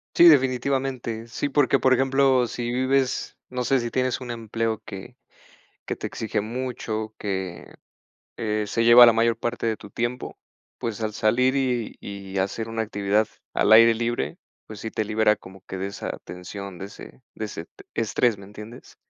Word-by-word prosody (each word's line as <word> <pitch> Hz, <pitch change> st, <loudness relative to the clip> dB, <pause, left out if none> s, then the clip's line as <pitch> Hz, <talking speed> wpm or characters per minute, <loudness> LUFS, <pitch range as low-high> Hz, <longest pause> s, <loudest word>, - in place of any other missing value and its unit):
Sí, 175 Hz, -, +8 dB
definitivamente, 130 Hz, -4 st, +2 dB
sí, 120 Hz, +5 st, -2 dB
porque, 140 Hz, -1 st, +3 dB
por 130 Hz, -1 st, +4 dB
ejemplo, 135 Hz, -1 st, +3 dB
si 120 Hz, +1 st, -4 dB
vives, 130 Hz, +1 st, 0 dB
no 125 Hz, 0 st, -2 dB
sé, 135 Hz, +1 st, +2 dB
si 120 Hz, -1 st, -3 dB
tienes 130 Hz, -1 st, 0 dB
un 125 Hz, -1 st, -5 dB
empleo 115 Hz, -1 st, -2 dB
que 95 Hz, -2 st, -9 dB, 0.7 s
que -, -, -2 dB
te -, -, -5 dB
exige 110 Hz, -2 st, -2 dB
mucho 110 Hz, -2 st, -4 dB
que, 95 Hz, -3 st, -4 dB, 0.6 s
eh, 105 Hz, -1 st, -1 dB
se 115 Hz, +3 st, 0 dB
lleva 120 Hz, +1 st, +10 dB
la 120 Hz, -, +7 dB
mayor 115 Hz, +1 st, +2 dB
parte 120 Hz, 0 st, -2 dB
de 110 Hz, -, 0 dB
tu 100 Hz, -, -13 dB
tiempo, 120 Hz, +2 st, -3 dB, 0.4 s
pues 115 Hz, -2 st, -4 dB
al 110 Hz, -1 st, -1 dB
salir 120 Hz, +5 st, +2 dB
y 125 Hz, -4 st, -1 dB
y 100 Hz, -1 st, -6 dB
hacer 105 Hz, +4 st, -2 dB
una 115 Hz, 0 st, -2 dB
actividad 105 Hz, 0 st, 0 dB, 0.3 s
al 110 Hz, -, +3 dB
aire 115 Hz, +1 st, +8 dB
libre, 120 Hz, +1 st, -2 dB, 0.3 s
pues 110 Hz, -2 st, -9 dB
sí 110 Hz, -, -5 dB
te 110 Hz, -, -1 dB
libera 105 Hz, 0 st, +3 dB
como 95 Hz, -1 st, -14 dB
que 95 Hz, -, -7 dB
de 95 Hz, -, -2 dB
esa 100 Hz, -, -5 dB
tensión, 90 Hz, +1 st, -8 dB
de 95 Hz, -, -6 dB
ese 105 Hz, +5 st, -13 dB
de 110 Hz, -, -4 dB
ese 90 Hz, -6 st, -6 dB
t -, -, -18 dB
estrés, 115 Hz, 0 st, +1 dB
¿me 100 Hz, -, -11 dB
entiendes? 105 Hz, +4 st, -11 dB
115 Hz, 180 wpm, -24 LUFS, 105-125 Hz, 0.7 s, lleva